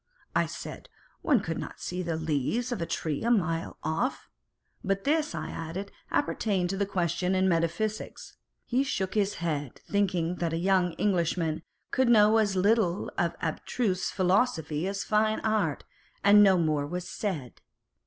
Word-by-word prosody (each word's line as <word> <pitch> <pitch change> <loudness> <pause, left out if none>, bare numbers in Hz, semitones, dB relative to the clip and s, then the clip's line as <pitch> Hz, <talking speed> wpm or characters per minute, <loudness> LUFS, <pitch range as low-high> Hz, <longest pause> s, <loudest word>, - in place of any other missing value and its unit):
I - - +3
said, - - -8 0.3
one 275 - +3
could 165 -4 -3
not - - -7
see 180 +1 -4
the 170 -2 -2
leaves 160 - -1
of 240 - -2
a 165 - -2
tree 155 -3 -2
a 235 - +1
mile 165 -8 0
off, 160 - -2 0.5
but 195 0 -1
this, 300 - +1
I 155 0 -4
added, 170 +5 -5 0.2
appertained 195 -10 0
to 195 +1 -3
a 200 - +1
question 180 -1 0
in 190 0 +3
metaphysics. 185 +5 -2 0.3
He 255 +2 +1
shook 195 -9 -2
his 205 -1 +1
head, 150 -6 -3
thinking 180 -4 0
that 170 -2 -1
a - - 0
young 180 -1 +2
Englishman 170 -3 0 0.3
could 260 -2 +2
know 215 -1 +6
as 205 -3 +1
little 195 -1 +2
of 170 -1 0
abstruse 185 +4 -1
philosophy 180 -5 +1
as 200 0 -2
of - - -15
fine 215 0 +2
art, 210 -9 0 0.4
and 205 +1 +8
no 195 -2 +6
more 155 -4 +1
was 180 +3 -4
said. 160 - -4
185 Hz, 165 wpm, -28 LUFS, 165-210 Hz, 0.5 s, and